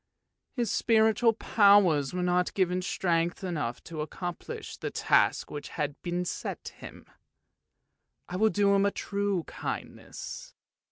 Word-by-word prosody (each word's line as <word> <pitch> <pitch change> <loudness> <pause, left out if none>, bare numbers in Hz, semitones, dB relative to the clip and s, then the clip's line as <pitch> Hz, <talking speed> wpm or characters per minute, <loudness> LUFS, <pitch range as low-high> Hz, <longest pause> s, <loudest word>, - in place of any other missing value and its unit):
His 240 -3 0
spiritual 225 0 +3
powers 200 -10 +4
were 180 0 -2
not 180 0 +1
given 185 -1 +1
strength 175 -1 0
enough 150 -10 -3
to 160 -3 -6
accomplish 175 +3 -6
the - - -4
task - - +2
which 145 -1 -6
had 145 -2 -4
been 175 0 -2
set - - -5
him. - - -11 1.2
I 180 - -6
will 220 +3 +4
do 200 -1 +3
him 200 0 +4
a - - +3
true 200 -3 -2
kindness! - - -7
180 Hz, 130 wpm, -29 LUFS, 170-205 Hz, 1.2 s, powers